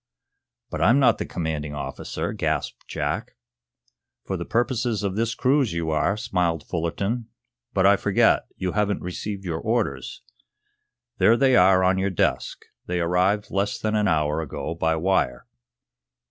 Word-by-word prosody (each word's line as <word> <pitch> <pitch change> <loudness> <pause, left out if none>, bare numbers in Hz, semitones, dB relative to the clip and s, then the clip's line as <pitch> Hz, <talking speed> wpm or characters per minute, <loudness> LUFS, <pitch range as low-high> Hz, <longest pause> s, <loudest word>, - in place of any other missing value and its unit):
"But 75 - -3
I'm 115 +10 +5
not 135 -3 +4
the - - -3
commanding 75 -3 -3
officer," 70 - -4
gasped - - -3
Jack. - - -3 0.9
"For - - -2
the - - -4
purposes 120 -2 0
of 95 -1 -1
this 115 +1 -1
cruise 130 - +2
you 85 -1 -2
are," 80 +7 +1
smiled 90 -8 -1
Fullerton. 100 +8 -2 0.5
"But - - +3
I - - +6
forget. - - +2
You 90 -1 -2
haven't 105 0 0
received 95 +2 -5
your 80 -2 -2
orders. 105 - -2 1.0
There 115 - +5
they 135 -1 +4
are 95 0 +5
on 95 +1 +3
your 95 +1 +1
desk. 95 - -1 0.2
They 90 0 -1
arrived 90 +5 +1
less 100 +1 0
than 110 0 -2
an 105 -1 +2
hour 75 -2 +1
ago 80 +1 -4
by 80 -1 0
wire." 80 -8 0
95 Hz, 150 wpm, -24 LUFS, 80-110 Hz, 1.0 s, I